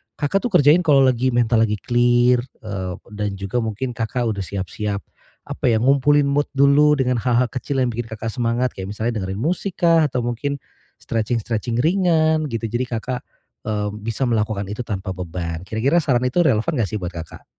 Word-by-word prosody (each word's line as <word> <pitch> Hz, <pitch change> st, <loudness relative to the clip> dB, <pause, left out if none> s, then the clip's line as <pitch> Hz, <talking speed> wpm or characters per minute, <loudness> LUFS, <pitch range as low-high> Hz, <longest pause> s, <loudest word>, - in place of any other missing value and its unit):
Kakak 150 Hz, +6 st, 0 dB
tuh -, -, -9 dB
kerjain 150 Hz, +1 st, +6 dB
kalo 140 Hz, -2 st, +6 dB
lagi 130 Hz, 0 st, +2 dB
mental 115 Hz, -1 st, +3 dB
lagi 105 Hz, -, -1 dB
clear, 120 Hz, 0 st, +3 dB, 0.2 s
eee, 95 Hz, -4 st, -4 dB, 0.2 s
dan 105 Hz, -1 st, -3 dB
juga 100 Hz, +5 st, -2 dB
mungkin 115 Hz, +3 st, -3 dB
Kakak 120 Hz, +1 st, -2 dB
udah 100 Hz, -, -4 dB
siap-siap 100 Hz, +2 st, -4 dB, 0.4 s
apa -, -, -1 dB
ya 115 Hz, -, +3 dB
ngumpulin 140 Hz, +4 st, +3 dB
mood 140 Hz, +1 st, 0 dB
dulu 145 Hz, +2 st, +5 dB
dengan 125 Hz, -3 st, +1 dB
hal-hal 125 Hz, +1 st, +2 dB
kecil 135 Hz, +2 st, -3 dB
yang 125 Hz, -2 st, 0 dB
bikin 115 Hz, 0 st, -5 dB
Kakak 110 Hz, 0 st, -5 dB
semangat. 120 Hz, 0 st, 0 dB
Kayak 95 Hz, 0 st, -6 dB
misalnya 115 Hz, -1 st, -1 dB
dengerin 95 Hz, +1 st, -4 dB
musik 180 Hz, +5 st, -2 dB
kah, 165 Hz, -2 st, +4 dB
atau 125 Hz, -2 st, -2 dB
mungkin 130 Hz, +4 st, -2 dB, 0.4 s
stretching-stretching 115 Hz, +1 st, -2 dB
ringan 160 Hz, -3 st, +2 dB
gitu. 115 Hz, -1 st, -3 dB
Jadi 120 Hz, +3 st, -2 dB
Kakak, 125 Hz, +2 st, -3 dB, 0.5 s
eee, 105 Hz, -1 st, -1 dB
bisa 115 Hz, +5 st, -2 dB
melakukan 110 Hz, -4 st, 0 dB
itu 105 Hz, +4 st, -4 dB
tanpa 95 Hz, -5 st, -4 dB
beban. 85 Hz, -2 st, -5 dB
Kira-kira 135 Hz, +10 st, +2 dB
saran 130 Hz, -4 st, +1 dB
itu 125 Hz, +8 st, +2 dB
relevan 135 Hz, -1 st, +2 dB
nggak 110 Hz, -6 st, 0 dB
sih 110 Hz, -, -3 dB
buat 90 Hz, -3 st, -5 dB
Kakak? 80 Hz, -2 st, -9 dB
120 Hz, 180 wpm, -21 LUFS, 105-135 Hz, 0.5 s, kerjain